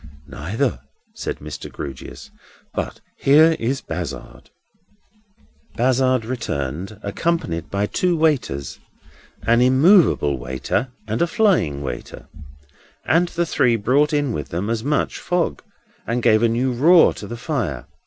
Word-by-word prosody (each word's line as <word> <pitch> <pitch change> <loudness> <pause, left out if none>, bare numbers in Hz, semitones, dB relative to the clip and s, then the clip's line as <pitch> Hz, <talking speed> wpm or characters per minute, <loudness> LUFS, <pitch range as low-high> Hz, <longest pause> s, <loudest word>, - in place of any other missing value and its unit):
"Neither," 110 - -2 0.3
said - - -5
Mr. 75 0 -8
Grewgious. 70 -2 -8 0.4
"But - - -4 0.2
here 155 +4 +5
is 130 +4 -1
Bazzard." - - -7 1.3
Bazzard 130 -1 +2
returned, 95 - -4
accompanied 100 - -2
by 100 +1 0
two 175 - 0
waiters—an 120 - -2
immovable 130 - +4
waiter, 65 - -2 0.2
and 110 +1 -2
a 170 - +3
flying 175 - +1
waiter; - - -7 0.8
and 170 +2 +3
the 170 0 -1
three 125 -7 +2
brought 130 +7 +2
in 145 -3 0
with 75 -7 -5
them 95 +6 -2
as 115 -1 -2
much 150 +3 -1
fog 175 -1 -1 0.5
as 120 +1 0
gave 110 -2 +4
a 115 - +3
new 125 +3 0
roar 165 +8 +6
to 105 - -9
the 120 - -6
fire. 115 - -3
120 Hz, 125 wpm, -21 LUFS, 95-150 Hz, 1.3 s, roar